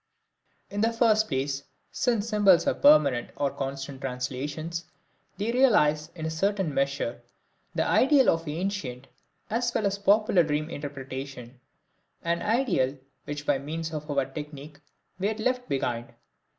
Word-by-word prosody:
In 205 +1 -2
the 225 +1 +3
first 220 -2 +3
place, 135 0 -1 0.3
since 235 -5 0
symbols 205 -5 +5
are - - +3
permanent 285 - +5
or 140 -1 0
constant 135 0 -5
translations, 140 +6 -4 0.5
they 210 +4 -1
realize, 165 - +3
in 160 -2 -5
a - - -1
certain 190 -1 0
measure, 135 -3 -1 0.5
the - - +1
ideal 270 -1 +4
of 165 0 -2
ancient 150 -6 -3 0.5
as 235 +2 +1
well 220 - +1
as 200 0 0
popular 200 -2 +4
dream 155 0 -1
interpretation, 135 -3 -7 0.6
an 170 0 0
ideal 210 - +1 0.3
which 145 0 -5
by 145 -2 +2
means 160 +3 -5
of 150 0 -5
our 140 -2 +1
technique 145 +1 -9 0.4
we 195 - +1
had 220 +1 -3
left 250 +2 -1
behind. 120 -3 -2
155 Hz, 140 wpm, -27 LUFS, 140-205 Hz, 0.6 s, symbols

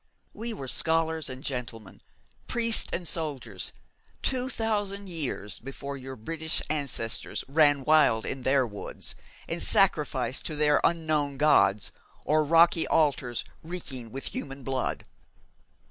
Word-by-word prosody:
We 230 +2 -4
were 135 -11 -6
scholars 160 +2 +1
and 130 +1 -8
gentleman, 120 -6 -6 0.5
priests 230 -1 +4
and 175 -1 -3
soldiers, 135 - -3 0.5
two 255 -1 0
thousand 205 -4 -2
years 140 - -3
before 140 +2 -7
your 130 0 -8
British 160 +7 0
ancestors 140 -7 -1
ran 145 -1 +4
wild 145 -7 +4
in 135 - -4
their 130 0 +3
woods, 105 -3 -2 0.3
and - - -3
sacrificed - - +2
to 155 - -5
their 150 0 +3
unknown 155 -4 +1
gods 105 -9 +4 0.3
or 155 +1 +3
rocky 165 +2 +4
altars 140 -6 +1 0.2
reeking 135 -9 -6
with 135 +1 -4
human 135 -1 -6
blood! 130 0 -2
145 Hz, 125 wpm, -27 LUFS, 130-165 Hz, 0.5 s, priests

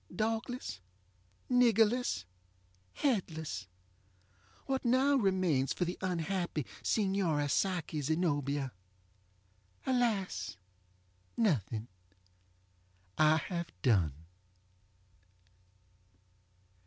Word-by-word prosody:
Dogless, 225 - -2 0.7
niggerless, 235 - +3 0.7
headless, 160 - -1 1.0
what 265 -1 -1
now 260 +3 +4
remains 185 - +2
for 180 - -1
the 175 +1 -3
unhappy 175 -4 -1 0.2
Signora 190 -8 +1
Psyche 165 -1 0
Zenobia? 145 -3 0 1.1
AlasŌĆönothing! 100 - -2 1.3
I 155 0 +6
have 170 +2 -3
done. 95 - +3
175 Hz, 55 wpm, -33 LUFS, 135-220 Hz, 1.3 s, I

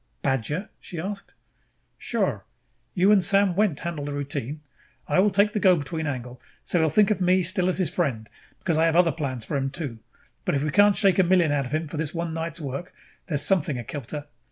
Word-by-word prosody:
"Badger?" 140 - -1
she 175 - -8
asked. 195 +4 -6 0.6
"Sure. - - -1 0.5
You 190 +2 +4
and 205 -2 +6
Sam 195 +1 +4
Wendt 200 -7 +1
handle 165 -3 -4
the 145 0 -4
routine. 145 0 -4 0.5
I - - +2
will 205 +2 +5
take 205 +2 +2
the 210 - 0
go 185 -2 +5
between 160 0 -3
angle, 125 -2 -5 0.2
so 175 - +1
he - - +3
will 160 - +3
think 205 +7 +4
of 200 - 0
me 185 +1 +4
as 170 - +1
still 185 -1 0
his 185 -1 +1
friend, 130 -12 -1 0.3
because 165 -4 0
I 165 - +4
have 165 - +1
other 175 -1 +5
plans 130 -8 -4
for 145 - -2
him 135 0 -1
too. 135 -6 -5 0.4
But - - 0
if 140 - 0
we 155 - -1
can't 205 +1 +5
shake 195 -1 +3
a - - +7
million 175 -3 +3
out 140 -2 0
of - - -11
him 155 +1 -1
for 150 - -7
this 155 +1 -3
one 170 -1 -3
night's 165 0 -4
work, 145 +4 -6 0.3
there 160 - -2
is 145 - +1
something 155 -8 +1
akilter. 145 +4 -6
165 Hz, 225 wpm, -25 LUFS, 145-185 Hz, 0.6 s, a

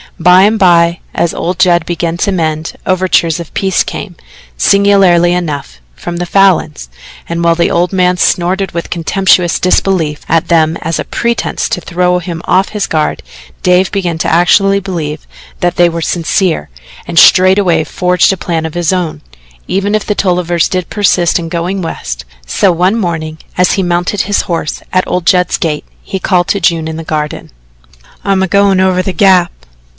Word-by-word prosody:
By 180 +2 +5
and 215 +2 +3
by, 170 -2 +3 0.2
as 170 - 0
old 180 +1 -3
Judd 175 -2 +2
began 170 0 -3
to 200 - 0
mend, 160 -3 -2
overtures 180 -3 +1
of 170 - -9
peace 190 -1 +1
came, 180 -4 -7 0.4
singularly 195 -4 +3
enough, 145 - -4 0.2
from 170 - -6
the 175 - -3
Falins, 175 - +1 0.4
and 170 0 -2
while 170 0 +3
the 170 0 +1
old 175 +2 0
man 180 -1 +2
snorted 185 +3 0
with 170 0 -5
contemptuous 180 0 +1
disbelief 180 -5 0
at 165 +1 +1
them 160 -1 +2
as 165 0 -2
a - - -1
pretence 235 0 -2
to 180 - -2
throw 180 +1 0
him 170 -2 -6
off 190 +2 +2
his 210 -2 -2
guard, 155 -1 -1 0.4
Dave 180 +1 +2
began 180 -5 -2
actually 195 +4 +3
to - - -3
believe 160 -6 -5 0.3
that 175 0 0
they 175 0 +4
were 170 0 -4
sincere, 165 - -1 0.4
and 170 - -5
straightway 185 -3 +5
forged 180 +3 +1
a - - -5
plan 165 -2 -3
of 160 - -5
his 175 -1 0
own, 180 -4 -3 0.5
even 195 +2 -1
if 215 - -2
the 210 - -1
Tollivers 175 -3 0
did 185 -2 -3
persist 180 -5 +1
in 165 - -5
going 175 +3 -3
West. 65 - -6 0.2
So 190 - +2
one 180 +4 +1
morning 160 -7 -3 0.2
as 180 0 +3
he 195 - 0
mounted 175 +3 -1
his 205 0 0
horse 165 -3 -3
at 185 0 +1
old 180 -2 -2
Judd's 180 -1 +2
gate, 150 -3 -2 0.2
he 190 - -5
called 180 -1 +1
to 200 - +1
June 165 -3 0
in 160 0 -5
the 165 - -6
garden: 150 -1 -4 0.7
"I'm 195 -1 +1
a - - 0
goin' 200 0 +2
over 185 -1 +2
to - - -8
the 190 - -2
Gap." 180 -1 +3
175 Hz, 180 wpm, -12 LUFS, 165-190 Hz, 0.7 s, By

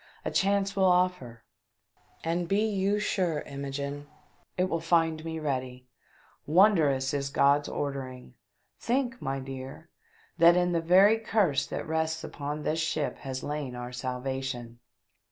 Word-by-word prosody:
A - - -1
chance 200 0 +1
will 190 -1 +3
offer, 180 - +1 0.8
and 170 +1 -1
be 200 +4 +2
you 200 -1 +1
sure, 185 -6 0
Imogene, 140 +1 -5 0.5
it 180 - +2
will 175 -3 -1
fmd 165 -1 +1
me 160 0 -4
ready. 130 -4 -3 0.6
Wondrous 150 -7 +4
is 140 -1 -1
God's 140 +1 +3
ordering! 130 - -5 0.5
Think, 250 +1 -1
my 135 0 -2
dear, 135 +4 -8 0.5
that 170 +1 +7
in 180 0 +2
the 170 -1 +1
very 190 +6 +5
Curse 200 -10 +1
that - - -5
rests 160 0 -1
upon 150 +1 -5
this 160 +1 0
ship 155 -2 -1
has 130 -1 -5
lain 145 -4 -4
our 125 0 -6
salvation 125 -1 -4
155 Hz, 135 wpm, -28 LUFS, 135-180 Hz, 0.8 s, that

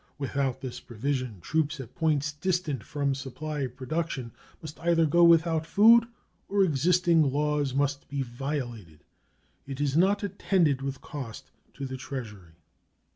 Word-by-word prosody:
Without 135 -2 -2
this 130 -3 -6
provision 125 -2 -3
troops 155 - -1
at 130 -5 -8
points 155 -2 +1
distant 155 - -2
from 140 +1 -1
supply 140 +2 -4
production 130 0 -4 0.3
must 155 -1 -9
either 165 -1 +3
go 170 +3 +4
without 165 -1 +5
food 225 +7 +6 0.4
or 200 0 +3
existing 170 +1 +3
laws 145 -1 0
must 140 0 -1
be 140 -1 -2
violated. 120 - -5 0.6
It 135 -1 -6
is 145 -1 0
not 195 +5 +3
attended 180 -7 +1
with 135 0 -4
cost 130 -7 -8 0.2
to 140 - -5
the 130 0 -5
Treasury. 105 - -8
145 Hz, 135 wpm, -28 LUFS, 130-165 Hz, 0.6 s, food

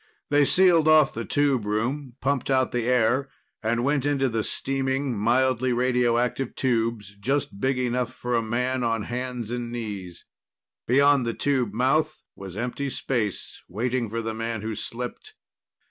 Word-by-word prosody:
They 145 0 +5
sealed 175 -1 +5
off 155 -3 +6
the 115 0 -4
tube 140 -1 +1
room, 120 +5 -2
pumped 140 -1 0
out 130 -1 +2
the 120 -2 -1
air, 125 +2 +2 0.3
and 115 +1 0
went 140 0 +1
into 135 -2 +1
the 115 -1 -1
steaming, 135 +2 -1
mildly 125 +3 +2
radioactive 125 0 +1
tubes, 115 -5 -1
just 130 -3 -1
big 130 +3 +1
enough 125 -1 -1
for 125 0 -4
a 115 - +3
man 125 +3 -1
on 115 -2 0
hands 125 -1 -4
and 120 -1 -3
knees. 100 -7 -6 0.6
Beyond 140 +2 +4
the 115 -1 -2
tube 130 -6 0
mouth 150 +6 +1
was 95 -1 -9
empty 125 +4 -2
space, 115 -6 -3
waiting 120 +4 -1
for 115 +1 -3
the 110 0 -3
man 115 -1 -3
who 110 0 -3
slipped. 125 - -6
125 Hz, 155 wpm, -25 LUFS, 115-135 Hz, 0.6 s, off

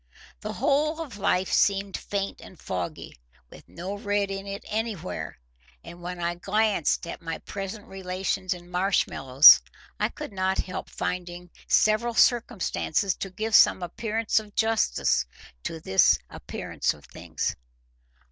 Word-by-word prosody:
The - - -5
whole 300 +4 +1
of 275 -11 -7
life 185 -1 +1
seemed 200 -1 +2
faint 195 -1 -4
and 185 - -14
foggy, 90 -2 -5 0.4
with - - -15
no 185 +4 -6
red 205 -1 0
in 195 0 -5
it 200 0 -6
anywhere; 210 - -4 0.5
and 175 +1 -11
when 180 0 -6
I 170 0 -1
glanced 200 -1 +1
at 170 - -7
my 165 -1 -4
present 200 +1 -7
relations 190 -1 -3
in 175 -1 -5
Marshmallows, 165 -7 +6 0.4
I - - +1
could 300 -8 -8
not 190 0 0
help 185 - -4
finding 175 -1 -5 0.2
several 220 +2 +3
circumstances 210 -6 +2
to 195 - -5
give 220 +4 -4
some 185 - +6
appearance 220 +5 0
of 210 -2 -13
justice 220 - +1 0.4
to 165 - -4
this 95 -11 +4
appearance - - -3
of - - -17
things. - - -4
195 Hz, 140 wpm, -26 LUFS, 175-215 Hz, 0.5 s, Marshmallows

